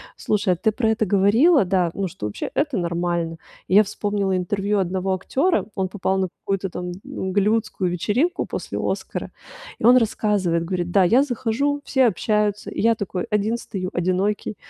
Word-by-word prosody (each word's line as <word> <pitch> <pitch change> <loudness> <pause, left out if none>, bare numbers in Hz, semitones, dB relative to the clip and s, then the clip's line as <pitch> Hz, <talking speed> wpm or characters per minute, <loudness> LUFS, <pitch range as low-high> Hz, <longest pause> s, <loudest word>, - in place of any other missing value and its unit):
Слушай, 205 -3 0
а - - -2
ты 220 +6 +1
про 225 +1 0
это 220 0 +1
говорила, 210 - +4
да, 180 -2 +1
ну, 195 -1 -2
что 105 - -6
вообще 105 - -5
это 290 -5 0
нормально. 170 -1 -1 0.3
И 185 - +1
я 210 - +8
вспомнила 205 -1 -1
интервью 200 +3 -1
одного 190 +1 -1
актера, 280 - 0
он 190 -1 -1
попал 190 0 -1
на 190 -2 0
какую-то 195 +1 -3
там 180 0 -5
голливудскую 195 -1 -1
вечеринку 245 - 0
после - - -5
Оскара, - - -3 0.5
и - - -11
он 245 +2 +8
рассказывает, 205 -7 +1
говорит, 175 0 -2
да: 195 +1 +4
"Я 235 +9 +4
захожу, 280 +3 -1
все 265 -3 +2
общаются. 210 0 0
И - - -4
я 230 +1 +4
такой 195 -3 -4
один 210 +2 0
стою, 185 -5 -5
одинокий, 185 +4 -1
200 Hz, 170 wpm, -22 LUFS, 185-220 Hz, 0.5 s, я